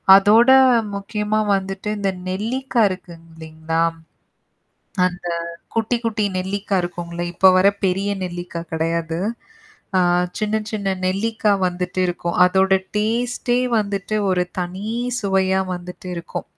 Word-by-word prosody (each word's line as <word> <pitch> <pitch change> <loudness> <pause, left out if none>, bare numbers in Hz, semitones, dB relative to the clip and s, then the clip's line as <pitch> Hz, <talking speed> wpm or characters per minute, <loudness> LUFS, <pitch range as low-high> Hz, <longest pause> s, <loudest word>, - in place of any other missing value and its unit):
அதோட 215 +5 +6 0.5
முக்கியமா 210 +1 -2 0.2
வந்துட்டு 195 +1 -4
இந்த 200 -1 0 0.2
நெல்லிக்கா 235 +6 -1
இருககு 185 -2 -7 0.2
இல்லைங்களா! 160 0 -3 1.3
அந்த 180 -1 -5 0.5
குட்டி 225 +2 +1
குட்டி 220 -2 0
நெல்லிக்கா 195 +2 -2
இருக்கும்ல! 175 -1 -6
இப்ப 190 +2 +6
வர 185 - +4 0.2
பெரிய 195 +2 0
நெல்லிக்கா 175 -1 -5
கெடையாது. 165 +1 -1 0.8
அ - - +4 0.4
சின்ன 215 0 0
சின்ன 200 -3 -1
நெல்லிக்கா 215 +3 0 0.2
வந்துட்டு 180 +1 -4
இருக்கும். 175 -1 -3
அதோட 190 +1 +2 0.3
டேஸ்ட்டே 240 +3 0 0.2
வந்துட்டு, 200 0 -3 0.2
ஒரு 180 -1 +1 0.2
தனி 185 +3 -5 0.4
சுவையா 190 -1 +2
வந்துட்டு 180 +1 -9
இருக்கும். 170 0 -6
190 Hz, 110 wpm, -21 LUFS, 175-210 Hz, 1.3 s, அதோட